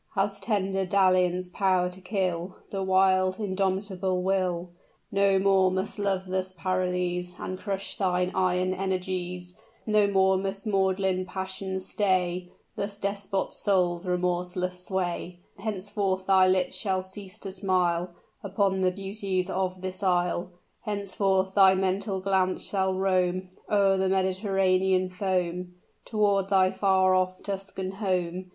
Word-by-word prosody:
Has 200 0 0
tender 195 -2 0
dalliance 185 -1 +2
power 185 -1 +2
to 185 +1 -12
kill 185 -2 -2 0.2
The 195 - -2
wild, 185 0 +3
indomitable 190 -2 -1
will? 180 -2 0 0.4
No 195 -1 +3
more 190 -1 +4
must 190 +3 -3
love 195 -2 0
thus 185 0 -3
paralyze 180 0 -1
And 185 0 -5
crush 195 -1 -3
thine 180 -1 +1
iron 185 0 +1
energies; 180 -1 -3 0.3
No 215 -2 +3
more 190 -1 +3
must 195 +1 -4
maudlin 190 -2 +1
passion 190 0 -3
stay 185 -2 0 0.3
Thy 200 - -2
despot 200 -1 -2
soul's 180 -3 0
remorseless 180 0 -1
sway; 180 -2 -2 0.2
Henceforth 195 -2 -2
thy 190 -1 +5
lips 185 -1 +1
shall 190 -3 0
cease 190 +1 -10
to 195 -3 -7
smile 180 -2 0 0.3
Upon 195 -1 0
the 185 - +4
beauties 195 -1 -2
of 185 0 -2
this 185 +1 -5
Isle; 180 -2 +1 0.3
Henceforth 195 -2 0
thy 190 -1 +6
mental 190 +1 -1
glance 190 -1 +1
shall 190 -1 0
roam, 185 -1 +1 0.2
O'er 200 -2 +3
the 190 0 +1
Mediterranean 190 -1 +1
foam, 180 -2 -2 0.3
Toward 200 -3 +1
thy 190 -1 +4
far 190 -1 +3
off 185 0 0
Tuscan 195 -1 -4
home! 185 -2 -2
190 Hz, 130 wpm, -27 LUFS, 185-195 Hz, 0.4 s, thy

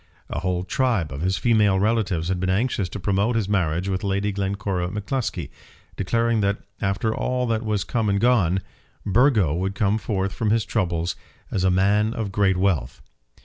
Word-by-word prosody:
A - - -2
whole 90 +1 -1
tribe 100 - 0
of 70 +2 -6
his 95 +2 0
female 105 -2 +3
relatives 100 -6 0
had 95 -1 0
been 95 +1 -1
anxious 100 -1 0
to 105 - -6
promote 100 +5 +1
his 110 -4 0
marriage 90 -3 0
with 95 -1 -2
Lady 100 +1 0
Glencora 100 -2 -2
M'Cluskie, 105 - -3 0.4
declaring 115 +3 +1
that, 100 0 +1 0.2
after 105 +2 0
all 125 0 -1
that 115 -2 0
was 105 -3 0
come 110 -1 -1
and 100 0 +1
gone, 100 -6 +3 0.4
Burgo 105 - +3
would 95 +4 -2
come 105 +1 +1
forth 95 -3 -2
from 110 -3 -1
his 110 0 +2
troubles 85 -5 -1 0.4
as 95 - 0
a 95 - +4
man 100 +4 +2
of 110 -4 -3
great 95 -2 +2
wealth. 90 -10 0
100 Hz, 180 wpm, -23 LUFS, 95-110 Hz, 0.4 s, a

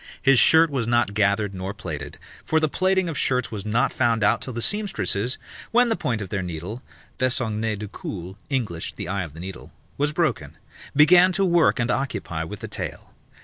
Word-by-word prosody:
His 135 -2 +5
shirt 160 -1 +6
was 125 -5 -1
not 120 -4 +2
gathered 100 0 +1
nor 95 +2 -5
plaited, 75 -7 -6 0.3
for 160 - +2
the 155 - +2
plaiting 190 +3 +1
of 165 - -3
shirts 125 -2 0
was 105 -1 -5
not 120 +5 +1
found 115 -4 +1
out - - +3
till 130 - -5
the 120 - -4
seamstresses 125 - -1 0.3
(when 240 +1 +4
the 225 - +2
point 115 - -2
of 95 - -9
their 95 0 -2
needle 90 +7 -6 0.4
(Besongner 115 -4 0
du 105 +1 -6
cul, 95 -2 -7
Englished 110 - -3
The - - -4
eye 100 +1 -1
of 80 -4 -7
the - - -10
needle.) 95 +1 -8 0.3
was 145 +1 +2
broken) 115 - -1 0.4
began 175 +5 +7
to 195 +2 +2
work 170 -6 +3
and 120 0 +1
occupy 100 -11 -2
with 80 - -8
the - - -5
tail. - - -6
115 Hz, 195 wpm, -24 LUFS, 100-150 Hz, 0.4 s, began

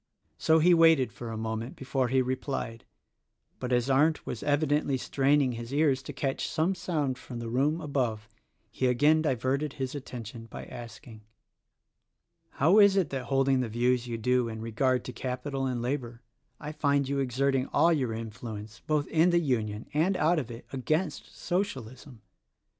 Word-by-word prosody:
So 160 - +4
he 175 +3 +5
waited 165 -6 +5
for 120 - -7
a 110 - -5
moment 110 +2 -4
before 135 -1 -1
he 130 +1 +2
replied; 130 -3 -4 0.7
but 125 0 -4
as 120 0 +2
Arndt 150 +4 +2
was 110 - -5
evidently 145 -1 +1
straining 140 +1 +2
his 120 +1 -7
ears 140 -2 +2
to 140 - -7
catch 135 0 -2
some 165 +4 +1
sound 150 -9 -2
from 125 - -8
the 115 -1 -5
room 145 +6 +1
above 125 -8 -2 0.4
he 130 - 0
again 145 +6 +4
diverted 135 0 0
his 130 -1 -4
attention 115 -5 -8
by - - -8
asking, 115 -1 -10 1.3
"How 170 +9 +4
is 200 -2 +7
it 185 -6 +1
that 135 -2 -3
holding 135 0 +2
the 125 -3 -1
views 120 +2 +1
you 115 -1 -3
do 125 +1 +1
in 110 -1 -6
regard 125 +3 0
to 125 - -6
capital 130 +2 -3
and 125 -2 -2
labor 120 -2 -3 0.4
I 150 0 -6
find 140 -2 +1
you 140 0 -1
exerting 135 +1 +1
all 170 +1 +3
your 130 -7 0
influence, 110 -1 -7
both 150 -2 +1
in 165 +2 +3
the 175 - +3
Union 110 -8 -1
and 175 +6 +2
out 170 +1 +3
of 125 -5 -5
it, 115 0 -9
against 155 +5 -2
Socialism? 130 - -4
130 Hz, 170 wpm, -28 LUFS, 120-150 Hz, 1.3 s, is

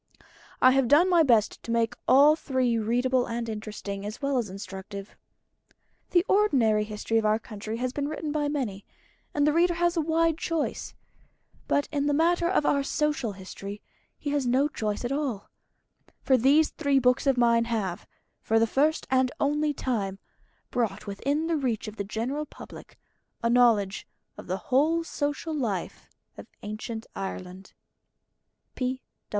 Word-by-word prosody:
I 255 - +8
have 270 -1 +2
done 325 +8 +5
my 345 -2 +6
best 235 -8 +3
to - - -11
make 230 0 +1
all 290 +3 +7
three 255 -6 0
readable 245 +3 +1
and 230 0 -3
interesting, 210 -2 -6
as 210 +2 -6
well 275 -2 0
as 225 -5 -3
instructive. 195 +1 -8 0.9
The 350 0 +3
ordinary 245 - +3
history 215 +1 -1
of 220 - -2
our 215 0 +3
country 215 0 -7
has 250 +1 -2
been 285 0 -2
written 310 0 -4
by 295 -1 0
many, 245 -10 -3 0.5
and 290 -1 +1
the 300 - +3
reader 345 +1 +3
has 345 +1 +1
a 330 - +2
wide 325 +1 +1
choice. 330 -3 -3 0.7
But 285 - +1
in 290 -1 0
the 290 - +2
matter 340 +2 +2
of 360 -5 +1
our 280 - +3
Social 290 -5 -1
History 195 +1 -8 0.4
he 290 - -4
has 285 -3 0
no 260 +4 +3
choice 215 -5 -3
at 240 - -2
all. 275 -8 -3 0.7
For 265 - +4
these 280 +6 +4
three 285 -3 +1
books 250 +1 +2
of 270 -2 +3
mine 235 -1 +4
have, 210 -7 -3 0.3
for 225 - +1
the 225 - +4
first 295 +7 +1
and 260 -1 +3
only 295 +1 +1
time, 210 -9 -2 0.5
brought 215 -5 -1
within 280 +10 -1
the 330 -1 0
reach 240 -6 -2
of 215 +1 -8
the 200 - -2
general 245 +9 -3
public - - -12 0.5
a 230 - +2
knowledge 225 -6 +3 0.3
of - - -11
the 185 +1 -1 0.2
whole 320 +5 +3
social 295 0 -3
life 220 - -3 0.3
of - - -10 0.2
Ancient 220 +2 -6
Ireland. 190 -1 -7
250 Hz, 160 wpm, -27 LUFS, 215-295 Hz, 0.9 s, I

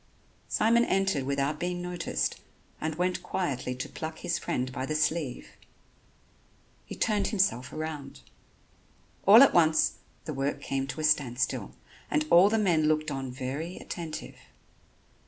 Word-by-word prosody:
Simon 230 +2 +3
entered 190 -8 +1
without 140 +2 -1
being 175 0 -2
noticed 175 -1 -2 0.4
and 155 0 -2
went 180 +2 -1
quietly 130 -8 -2
to 125 - -5
pluck 160 0 -6
his 170 - -2
friend 130 +1 -2
by 130 0 -4
the 155 +3 -2
sleeve. 150 -3 -1 1.4
He - - -7
turned 210 -2 +1
himself 130 - 0
round. 155 -2 -6 1.1
All 220 +6 +10
at - - +5
once 160 -2 +3 0.3
the 155 - -4
work 140 +1 -2
came 135 -1 -2
to 135 +4 -5
a - - -4
standstill 125 - 0 0.3
and 150 0 +1
all 180 +4 +7
the 225 - +1
men 175 -7 +2
looked 155 0 +1
on 135 -2 -4
very 135 +7 -5
attentive. 165 -3 -7
155 Hz, 140 wpm, -28 LUFS, 135-175 Hz, 1.4 s, All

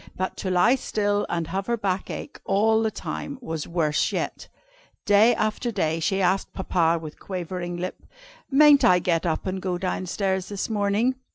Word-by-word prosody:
But 185 0 -2
to 190 - -3
lie 185 +7 +4
still 205 -5 0
and 170 -1 -1
have 195 +2 -3
her 235 0 0
back 195 -3 -2
ache - - -7
all 220 +3 +2
the 220 - +1
time, 280 +5 -6
was 160 - -5
worse 160 -3 0
yet. - - -3 0.6
Day 210 +3 +5
after 215 +3 -1
day 165 -6 0
she 195 +3 0
asked 190 +2 +1
Papa 170 -3 +1
with 155 -2 -9
quivering 180 -1 -5
lip: 180 +1 -6 0.4
"Mayn't 290 0 +6
I 180 - +6
get 175 -1 0
up 160 - -1
and 190 0 -3
go 180 -1 -2
down 185 0 -3
stairs 190 0 -1
this 205 +2 -4
morning?" 215 +5 +1
190 Hz, 180 wpm, -25 LUFS, 175-215 Hz, 0.6 s, Mayn't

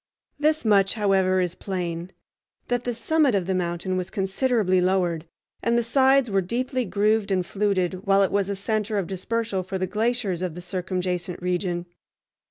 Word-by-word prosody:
This 305 -2 +2
much, 200 -2 +4
however, 190 -3 +2
is 175 -2 -1
plain: 175 -2 -4 0.6
that 245 0 0
the 245 - -1
summit 290 0 +2
of 190 -3 0
the 190 - 0
mountain 180 +1 -1
was 180 -1 -3
considerably 195 -1 +1
lowered, 180 -3 +1 0.3
and 235 0 +2
the 235 - +2
sides 265 +2 +4
were 195 -3 +1
deeply 250 +6 -2
grooved 210 +1 +1
and 185 -2 +1
fluted 190 -1 -1
while 195 0 +5
it 195 - 0
was 200 -1 +1
a 200 - -1
center 215 +1 -1
of 195 - 0
dispersal 195 +2 -2
for 190 +1 -4
the 185 - -1
glaciers 215 -2 -1
of 180 -3 -3
the 180 - -7
circumjacent 180 -1 -3
region. 180 -1 -1
195 Hz, 175 wpm, -25 LUFS, 180-225 Hz, 0.6 s, while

